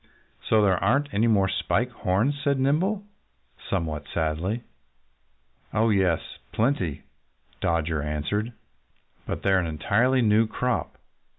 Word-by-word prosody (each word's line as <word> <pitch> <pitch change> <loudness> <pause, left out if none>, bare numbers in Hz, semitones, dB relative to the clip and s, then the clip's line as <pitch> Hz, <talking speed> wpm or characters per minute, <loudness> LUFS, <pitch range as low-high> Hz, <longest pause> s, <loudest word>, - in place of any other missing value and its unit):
"So 110 -1 +5
there 95 -3 +2
aren't 140 +8 +1
any 110 +3 +2
more 100 -4 +3
Spike 115 +5 0
Horns!" 120 +8 0
said 140 -2 +1
Nimble 180 +10 +1 0.7
somewhat 80 -6 -2
sadly. 85 +8 -1 1.1
"Oh, 110 +1 +3
yes! 95 -5 0
Plenty!" 110 - 0 0.6
Dodger 80 -2 0
answered. 75 +10 -2 0.8
"But - - -4
they're 95 -1 +4
an 90 - -1
entirely 115 - +2
new 110 +1 +4
crop. 125 +2 -2
105 Hz, 115 wpm, -25 LUFS, 85-125 Hz, 1.1 s, So